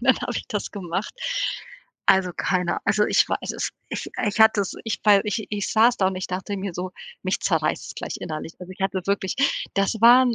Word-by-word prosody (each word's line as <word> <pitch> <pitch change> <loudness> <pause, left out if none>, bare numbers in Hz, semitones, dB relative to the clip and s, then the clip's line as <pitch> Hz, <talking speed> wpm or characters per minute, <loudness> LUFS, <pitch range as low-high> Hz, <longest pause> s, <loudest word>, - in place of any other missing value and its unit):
Dann 260 +1 +4
habe 245 - -3
ich - - -4
das 210 -5 -3
gemacht. 190 0 -4 0.9
Also, 185 -2 +4
keiner 180 -2 0
also, 210 0 +3
ich - - +3
weiß - - -2
es - - -2 0.2
ich - - -5 0.2
ich 210 +2 -1
hatte 220 -1 +6
es, 195 - -2
ich 225 - -2
wei 205 -2 +7
ich 210 +1 -2
ich 205 -1 -2
saß 235 +2 +5
da 190 - +3
und 190 - -4
ich 185 - -3
dachte 190 +2 -4
mir 195 -2 -4
so: 180 +1 -4 0.3
„Mich - - -1
zerreißt - - 0
es - - -8
gleich - - -5
innerlich.“ 155 0 -5
Also, 180 +1 -8
ich 185 - -17
hatte 190 0 0
wirklich 200 -2 0 0.4
das 195 +1 +2
waren 245 +1 +7
200 Hz, 215 wpm, -24 LUFS, 185-220 Hz, 0.9 s, wei